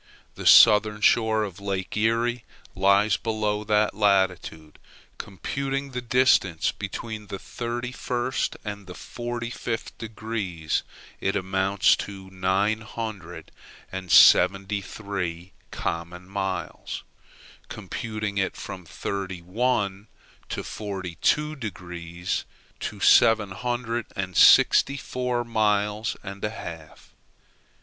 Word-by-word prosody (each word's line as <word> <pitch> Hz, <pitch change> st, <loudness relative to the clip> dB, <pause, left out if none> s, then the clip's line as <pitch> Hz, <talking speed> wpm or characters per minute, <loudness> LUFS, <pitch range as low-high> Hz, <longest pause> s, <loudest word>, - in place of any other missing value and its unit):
The -, -, -4 dB
southern 105 Hz, -1 st, +7 dB
shore 110 Hz, -1 st, +3 dB
of 100 Hz, -2 st, -6 dB
Lake 100 Hz, -2 st, -3 dB
Erie 115 Hz, +2 st, +1 dB, 0.3 s
lies 100 Hz, +2 st, +3 dB
below 105 Hz, -2 st, -1 dB
that 105 Hz, 0 st, +2 dB
latitude. 95 Hz, -6 st, 0 dB, 0.4 s
Computing 135 Hz, +7 st, -4 dB
the 125 Hz, -1 st, -4 dB
distance 120 Hz, -8 st, +3 dB
between 105 Hz, +1 st, -6 dB
the 100 Hz, -, -5 dB
thirty 120 Hz, +4 st, -5 dB
first 125 Hz, 0 st, -2 dB
and 105 Hz, -2 st, -6 dB
forty 120 Hz, 0 st, -5 dB
fifth 115 Hz, -1 st, -4 dB
degrees, 105 Hz, -8 st, -3 dB, 0.4 s
it 100 Hz, -, -1 dB
amounts 95 Hz, +1 st, +2 dB
to 95 Hz, -1 st, -8 dB
nine 95 Hz, +4 st, +1 dB
hundred 105 Hz, -6 st, -7 dB, 0.4 s
and 95 Hz, -2 st, -6 dB
seventy 100 Hz, +5 st, +6 dB
three 90 Hz, -3 st, -5 dB, 0.2 s
common 85 Hz, +2 st, -4 dB
miles; 95 Hz, -1 st, -4 dB, 0.7 s
computing 110 Hz, -2 st, -4 dB
it 95 Hz, -, -1 dB
from 90 Hz, -2 st, -8 dB
thirty 95 Hz, +1 st, -5 dB
one 100 Hz, 0 st, -1 dB, 0.4 s
to -, -, -3 dB
forty 95 Hz, -5 st, -6 dB
two 150 Hz, 0 st, +2 dB
degrees, 90 Hz, -, -5 dB, 0.4 s
to -, -, -5 dB
seven 110 Hz, -3 st, +5 dB
hundred 120 Hz, +2 st, -3 dB
and 95 Hz, -2 st, -4 dB
sixty 140 Hz, +1 st, +6 dB
four 125 Hz, -2 st, -2 dB
miles 105 Hz, -1 st, 0 dB
and 100 Hz, 0 st, -8 dB
a 105 Hz, -, 0 dB
half. 80 Hz, -7 st, -10 dB
105 Hz, 110 wpm, -25 LUFS, 95-115 Hz, 0.7 s, southern